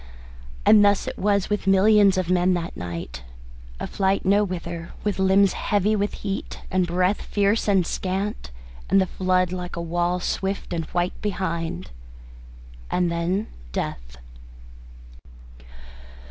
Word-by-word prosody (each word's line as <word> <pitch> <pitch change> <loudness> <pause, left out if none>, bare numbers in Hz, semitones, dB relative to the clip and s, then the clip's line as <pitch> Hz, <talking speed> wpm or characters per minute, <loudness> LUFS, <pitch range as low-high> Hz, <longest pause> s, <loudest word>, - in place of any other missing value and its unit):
And 210 -1 +7
thus 205 -1 +3
it - - -5
was 200 -1 +1
with 210 -2 -1
millions 195 0 +5
of 185 -2 0
men 180 0 +3
that 170 -1 -4
night 85 -9 -6 0.6
a - - -3
flight 195 0 0
nowhither, 180 -4 0
with 205 -2 -1
limbs 190 0 +4
heavy 205 +1 +1
with 205 0 -1
heat 195 -1 -5
and 185 -1 +2
breath 180 +3 +1
fierce 205 +2 +1
and 195 -4 +3
scant, 190 - -3 0.4
and 195 - +5
the 190 - +3
flood 185 0 0
like 180 -1 -5
a - - -4
wall 175 +1 0
swift 190 +1 -3
and 165 -2 -2
white 175 +2 -2
behind. 170 - -3 1.0
And 180 -1 +1
then 175 +5 -1 0.3
death. - - -4
185 Hz, 130 wpm, -24 LUFS, 175-200 Hz, 1.0 s, And